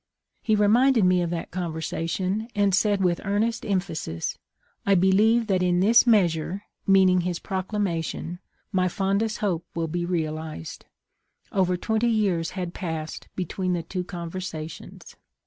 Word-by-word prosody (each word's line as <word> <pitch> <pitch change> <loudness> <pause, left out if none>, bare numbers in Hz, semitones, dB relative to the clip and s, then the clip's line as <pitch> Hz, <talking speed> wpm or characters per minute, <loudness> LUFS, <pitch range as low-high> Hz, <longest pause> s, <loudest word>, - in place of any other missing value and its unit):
He 220 - +2
reminded 225 +2 +4
me 180 0 +4
of 170 - -1
that 170 -1 -4
conversation, 175 +4 -2
and 200 -1 +2
said 200 0 +2
with 175 -2 +1
earnest 220 +3 0
emphasis, 175 - -2 0.3
' - - -39
I 200 - +3
believe 210 +6 +4
that 190 -4 +1
in 180 -1 +2
this 230 +6 +5
measure 185 -3 +2 0.2
[meaning 190 -2 +5
his 175 0 -2
Proclamation] 185 -3 -3 0.3
my 185 -1 +2
fondest 200 +4 0
hope 175 -4 0
will 165 -1 -1
be 175 +2 -2
realized.' 155 - -4 0.7
Over 180 -2 +1
twenty 220 +5 0
years 195 -7 +1
had 180 -2 -3
passed 160 -4 -5
between 185 0 -2
the 170 -1 -2
two 180 +2 -4
conversations. 170 -2 -7
185 Hz, 140 wpm, -25 LUFS, 170-205 Hz, 0.7 s, this